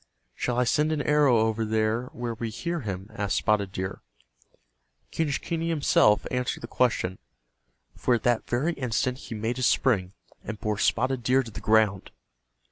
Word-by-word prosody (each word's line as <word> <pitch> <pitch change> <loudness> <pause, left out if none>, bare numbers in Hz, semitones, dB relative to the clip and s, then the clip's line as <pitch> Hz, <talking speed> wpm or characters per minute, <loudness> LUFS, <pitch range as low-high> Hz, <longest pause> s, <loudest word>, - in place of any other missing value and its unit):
"Shall 125 -1 -2
I 125 - +4
send 150 +6 +2
an 150 -2 -1
arrow 145 -5 +4
over 110 0 +1
there 110 +2 0
where 120 -2 -5
we 115 0 -4
hear 170 +10 -3
him?" 100 -4 -6
asked 100 -3 -1
Spotted 105 -3 +1
Deer. 95 0 -5 1.1
Quenischquney 160 +2 -1
himself 140 -9 +3
answered 125 -1 -2
the 120 - -6
question, 110 -8 0 0.8
for 125 - +2
at 115 - -3
that 120 -2 +1
very 140 +8 +1
instant 125 -1 -1
he 115 - -7
made 115 +3 -2
his 130 - +2
spring, 100 -8 +1 0.3
and 110 -1 -6
bore 105 -2 -2
Spotted 130 +4 +1
Deer 130 +2 +3
to 115 - -10
the - - -8
ground. 105 -3 +2
120 Hz, 165 wpm, -26 LUFS, 110-130 Hz, 1.1 s, I